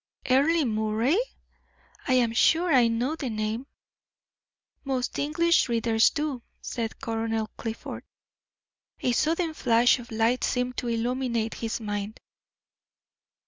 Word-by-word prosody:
"Earle 285 +5 +3
Moray! 220 - +1 0.9
I 255 - +3
am 235 -3 +2
sure 330 +7 +3
I 245 -3 +6
know 235 +6 0
the 280 -6 -4
name." 215 +4 -3 1.2
"Most 265 -3 -2
English 325 +1 +2
readers 230 -1 +3
do," 295 -5 -3 0.2
said 225 -2 -4
Colonel 225 -1 -2
Clifford. 225 -1 -6 1.0
A 250 - +1
sudden 325 +6 +1
flash 245 -2 +3
of 235 - -11
light 225 +3 +1
seemed 250 0 -1
to 245 - -2
illuminate 235 -1 -1
his 225 0 -3
mind. 205 -1 -4
240 Hz, 115 wpm, -26 LUFS, 225-270 Hz, 1.2 s, I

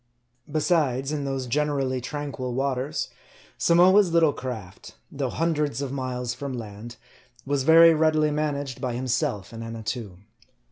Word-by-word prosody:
Besides, 145 -4 +1
in 145 -2 -2
those 135 -1 -2
generally 135 -1 0
tranquil 130 -2 -4
waters, 135 +1 -1 0.5
Samoa's 180 +2 +5
little 165 -3 +4
craft, 115 -8 -8 0.2
though - - -2
hundreds 150 -4 -1
of 140 -2 -3
miles 125 -2 -3
from 130 0 -5
land, 110 +1 -8 0.5
was 140 0 0
very 165 +3 +7
readily 155 -1 +2
managed 145 -3 -2
by 125 -3 -2
himself 125 - -2
and 115 0 -7
Annatoo. 115 -3 -5
135 Hz, 130 wpm, -25 LUFS, 125-150 Hz, 0.5 s, very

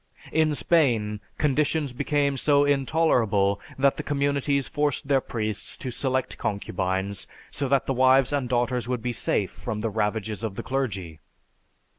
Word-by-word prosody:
In 155 -1 +2
Spain, 115 -12 +2 0.2
conditions 150 -1 +1
became 140 +1 +1
so 145 +2 +3
intolerable 125 -9 +2 0.2
that 135 0 +3
the - - -2
communities 140 -1 0
forced 145 -1 -1
their 135 -2 +3
priests 110 -4 -3
to 130 - -5
select 130 +1 -2
concubines 95 0 -2 0.2
so 140 - -2
that 135 0 +2
the 135 - 0
wives 130 +1 +4
and 135 -4 -1
daughters 120 -1 0
would 125 -2 -2
be 125 -1 -1
safe 105 -3 -1
from 110 -3 -5
the 110 0 -1
ravages 110 +1 -2
of 110 -4 -3
the - - -5
clergy. 100 - -3
130 Hz, 150 wpm, -25 LUFS, 105-140 Hz, 0.2 s, wives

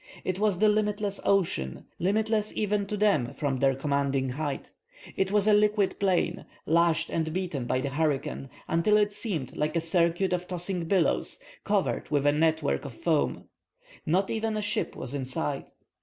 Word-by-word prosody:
It 185 0 -2
was 210 -3 +2
the 215 +3 +4
limitless 210 -1 0
ocean, 170 - 0
limitless 215 +3 +1
even 210 -1 0
to 210 - -3
them 195 - +2
from 140 -3 -1
their 135 0 +3
commanding 140 -1 0
height. 145 +2 -4 0.4
It 190 0 0
was 205 -1 +3
a 215 - +5
liquid 210 -1 +2
plain, 180 -3 +1 0.2
lashed 165 0 +2
and 160 -1 -1
beaten 170 -7 -3
by 130 - +1
the 140 - -2
hurricane, 145 -2 -1 0.2
until 170 +6 +3
it 210 -1 +2
seemed 170 - -4
like 150 +2 -1
a - - +3
circuit 170 +2 +1
of 180 0 -2
tossing 180 -1 -3
billows, 180 0 +1 0.3
covered 200 -2 0
with 145 -2 +1
a 145 - +6
net 160 +1 +2
work - - 0
of 135 -5 -8
foam. 160 +1 0 0.6
Not 185 +5 +1
even 220 -1 -1
a - - -1
ship 205 - -1
was 130 +1 -6
in 140 -2 -2
sight. 140 +2 -3
170 Hz, 175 wpm, -28 LUFS, 145-205 Hz, 0.6 s, a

